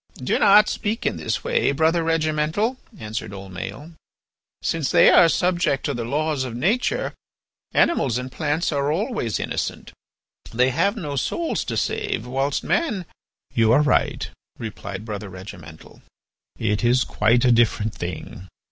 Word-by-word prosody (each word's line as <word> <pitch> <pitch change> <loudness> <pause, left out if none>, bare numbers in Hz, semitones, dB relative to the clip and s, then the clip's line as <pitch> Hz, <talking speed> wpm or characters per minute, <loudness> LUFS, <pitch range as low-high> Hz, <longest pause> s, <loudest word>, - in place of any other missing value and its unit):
"Do 130 - 0
not 210 +1 +7
speak 215 +3 -2
in - - 0
this - - -2
way, 485 - +1
Brother 160 +3 +2
Regimental," 160 +8 0 0.2
answered 110 - -5
old 95 0 -9
Maël. 105 - -7 0.7
"Since 160 -5 0
they - - +6
are 170 - +7
subject 175 -6 +1
to 145 - 0
the 120 -2 -3
law 155 +6 -1
of 130 -4 -3
nature, 200 - 0 0.6
animals 130 - +2
and 125 +1 -5
plants 155 +4 -1
are 140 0 0
always 190 - -1
innocent. - - -4 0.6
They 125 +3 +2
have 200 - +1
no 145 -8 -4
souls 335 - -1
to - - -3
save, 435 - -1
whilst 135 +3 -1
man—" 215 - 0 0.5
"You 115 -1 +3
are 145 +4 +5
right," 150 - +1 0.3
replied 100 -2 -7
Brother 105 -2 -5
Regimental, 90 -4 -11 0.6
"it 105 +1 -1
is 125 +2 +4
quite 115 +4 +2
a 125 - +5
different 115 -2 +2
thing. 90 +1 -7
140 Hz, 145 wpm, -23 LUFS, 115-170 Hz, 0.7 s, not